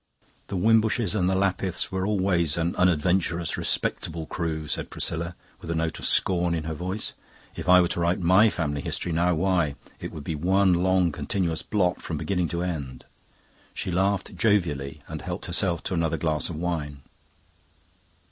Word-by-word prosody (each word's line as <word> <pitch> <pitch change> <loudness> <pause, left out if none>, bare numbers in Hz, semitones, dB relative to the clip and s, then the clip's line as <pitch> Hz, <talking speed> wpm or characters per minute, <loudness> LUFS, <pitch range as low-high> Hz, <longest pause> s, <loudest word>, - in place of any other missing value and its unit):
"The 100 - -3
Wimbushes 110 0 +3
and 90 -4 +2
the 95 - +1
Lapiths 95 -1 0
were 95 0 -1
always 95 -6 +1
an 85 +1 0
unadventurous, 85 -1 +1
respectable 80 -1 -1
crew," 80 -1 -3
said - - -3
Priscilla, 85 +1 -3 0.2
with 85 - -9
a 85 - 0
note 80 0 -1
of - - -1
scorn 90 -2 +2
in 80 - -2
her 80 0 -3
voice. 90 +6 -3 0.4
"If - - -4
I 90 0 +9
were 90 - +4
to - - -2
write 85 +1 +1
my 95 +5 +5
family 75 -7 -2
history 85 - -3
now! 85 +2 +2
Why, 85 -4 +1 0.2
it - - -6
would 75 - -8
be 80 - -3
one 95 +4 +3
long 90 0 +3
continuous 85 +1 -1
blot 90 -4 0
from - - -4
beginning 90 -3 0
to 85 +2 -2
end." 70 -8 -5 0.7
She - - -3
laughed 95 +2 0
jovially, 80 -11 0
and - - -6
helped - - -4
herself 90 0 0
to - - -3
another 80 -2 0
glass 80 -2 -1
of 85 - -5
wine. 75 -4 -3
85 Hz, 175 wpm, -26 LUFS, 80-95 Hz, 0.7 s, I